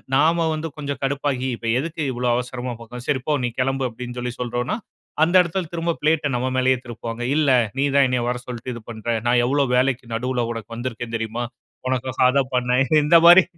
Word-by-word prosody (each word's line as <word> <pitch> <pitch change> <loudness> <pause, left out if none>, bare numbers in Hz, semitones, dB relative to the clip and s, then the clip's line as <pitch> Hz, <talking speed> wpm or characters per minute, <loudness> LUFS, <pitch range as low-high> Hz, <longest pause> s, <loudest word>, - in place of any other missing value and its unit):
நாம 165 +4 +3
வந்து 155 +1 -3
கொஞ்சம் 140 -2 -4
கடுப்பாகி, 135 -1 -1
"இப்ப 115 - -6
எதுக்கு 165 +3 -4
இவ்வளோ 125 +1 -2
அவசரமா 125 0 -3
போகணும்?" 120 +2 -9
"சரி 135 - +1
போ! 155 - +2
நீ - - 0
கெளம்பு" 135 +1 0
அப்டின்னு 120 +2 -8
சொல்லி 125 0 -3
சொல்றோன்னா. 120 - -2 0.5
அந்த 170 +3 +2
எடத்துல 170 -1 -3
திரும்ப 170 0 0
பிளேட்ட 155 0 +2
நம்ம 125 +1 0
மேலேயே 130 0 +3
திருப்புவாங்க. 120 0 -6
"இல்ல. 150 -3 +3 0.3
நீ 140 - +3
தான் 140 -1 +6
என்னைய 125 -1 0
வர 125 0 -2
சொல்லிட்டு 125 0 -5
இது 115 - -8
பண்ற, 110 0 -10 0.2
நான் 120 0 +4
எவ்வளோ 140 +2 +2
வேலைக்கு 125 -2 0
நடுவுல 125 0 -1
உனக்கு 115 0 -7
வந்துருக்கேன் 120 -1 -4
தெரியுமா? 115 +2 -3 0.4
உனக்காக 130 0 -2
அத 140 +1 +3
பண்ணேன்." 125 +1 +2 0.2
இந்த 165 +3 +6
மாரி 175 +2 +10
130 Hz, 190 wpm, -22 LUFS, 120-145 Hz, 0.5 s, மாரி